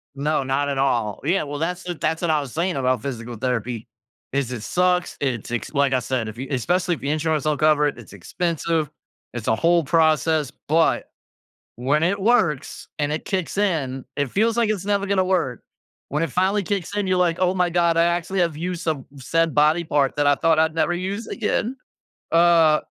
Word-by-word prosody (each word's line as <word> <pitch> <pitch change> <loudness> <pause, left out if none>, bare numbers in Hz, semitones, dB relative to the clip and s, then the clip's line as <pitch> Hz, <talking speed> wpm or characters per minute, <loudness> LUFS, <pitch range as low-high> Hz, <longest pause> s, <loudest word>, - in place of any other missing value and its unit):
No, 145 +1 0
not 135 +2 0
at 140 - -2
all. 120 -6 0
Yeah. 180 +6 +2
Well, 145 -1 -5
that's 180 +3 -2
the 180 - -3
that's 160 0 -2
what 170 -2 +1
I 155 - +2
was 140 -4 -6
saying 175 +3 -1
about 130 -3 +1
physical 120 -3 -5
therapy, 120 -1 -3 0.4
is 135 -2 -1
it 120 -4 -5
sucks, 180 +3 +1
it's 125 -6 -2
ex 120 - -4
like 140 -2 +2
I 130 - +3
said, 120 -2 -2
if 110 - -10
you 130 +2 -5
especially 175 +7 0
if - - -14
the 140 - -2
insurance 155 0 0
don't 150 -1 0
cover 155 -1 +4
it, 145 - -4
it's 110 -5 -13
expensive. 165 - -2 0.4
It's 120 -3 -6
a 110 - +3
whole 170 +6 +3
process. 155 -1 +2 0.2
But, 160 +2 +2 0.7
when 140 +6 +1
it 195 +4 +1
works 190 - +1
and 145 0 0
it 155 - -3
kicks 190 -2 -2
in, 145 -10 -1
it 145 -2 -1
feels 225 - +1
like 230 -2 +2
it's 200 -3 -2
never 200 -1 0
gonna 190 -1 +2
work. 175 -10 -1 0.5
When 150 +2 -1
it 165 - 0
finally 190 +7 +1
kicks 200 -1 -3
in, 205 -2 -1
you're 185 0 +2
like, 175 -2 +2
"Oh 185 0 +2
my 180 -2 +1
god. 170 -1 +2
I 165 - +5
actually 175 +2 0
have 170 -3 0
used 175 +2 -4
some 155 -5 -2
said 165 +4 0
body 155 +3 +4
part 145 -4 +1
that 145 0 +2
I 145 - +5
thought 160 +2 +2
I'd 160 0 +2
never 165 +2 +1
use 195 +5 -3
again." 235 +2 -1 0.6
Uh 165 -2 +5
160 Hz, 210 wpm, -22 LUFS, 140-180 Hz, 0.7 s, I